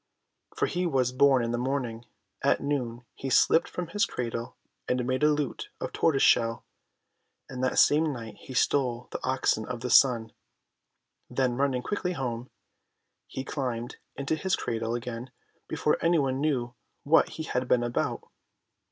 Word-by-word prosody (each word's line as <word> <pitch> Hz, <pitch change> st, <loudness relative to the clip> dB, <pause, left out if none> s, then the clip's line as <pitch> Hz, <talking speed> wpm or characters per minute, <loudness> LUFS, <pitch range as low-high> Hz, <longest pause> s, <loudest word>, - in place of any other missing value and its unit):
For 430 Hz, 0 st, +1 dB
he 180 Hz, -1 st, -1 dB
was 130 Hz, -5 st, +1 dB
born 130 Hz, -1 st, +4 dB
in 115 Hz, -, -1 dB
the 120 Hz, -, -1 dB
morning, 125 Hz, -3 st, -2 dB, 0.4 s
at -, -, +3 dB
noon 125 Hz, -5 st, -2 dB
he 135 Hz, -, -5 dB
slipped 165 Hz, +5 st, +4 dB
from 175 Hz, -2 st, -5 dB
his 205 Hz, +2 st, +1 dB
cradle 115 Hz, -1 st, -4 dB, 0.3 s
and 125 Hz, -1 st, 0 dB
made 130 Hz, +2 st, -1 dB
a 150 Hz, -, +5 dB
lute 150 Hz, -3 st, -2 dB
of -, -, -5 dB
tortoise 145 Hz, -5 st, +2 dB
shell, 115 Hz, 0 st, +3 dB, 0.8 s
and 130 Hz, -1 st, -5 dB
that 130 Hz, -, 0 dB
same 155 Hz, +1 st, +5 dB
night 115 Hz, -5 st, -7 dB
he 130 Hz, -, -10 dB
stole 125 Hz, -2 st, +1 dB
the -, -, -5 dB
Oxen 130 Hz, -4 st, +1 dB
of 125 Hz, -2 st, -5 dB
the 125 Hz, 0 st, -3 dB
Sun; 120 Hz, -5 st, +5 dB, 1.0 s
then 130 Hz, -2 st, 0 dB
running 130 Hz, -2 st, 0 dB
quickly 185 Hz, 0 st, -2 dB
home, 125 Hz, -4 st, -4 dB, 0.8 s
he 130 Hz, -, -5 dB
climbed 125 Hz, -3 st, -4 dB, 0.2 s
into 140 Hz, +2 st, -2 dB
his 190 Hz, +5 st, 0 dB
cradle 115 Hz, 0 st, -2 dB
again, 120 Hz, +1 st, -5 dB, 0.4 s
before 150 Hz, -, 0 dB
any 170 Hz, 0 st, +4 dB
one 135 Hz, -2 st, 0 dB
knew 125 Hz, -6 st, 0 dB, 0.3 s
what 160 Hz, +3 st, +4 dB
he 160 Hz, -, -3 dB
had 125 Hz, -4 st, -2 dB
been 120 Hz, -1 st, +3 dB
about. 120 Hz, 0 st, -1 dB
130 Hz, 160 wpm, -28 LUFS, 120-145 Hz, 1.0 s, a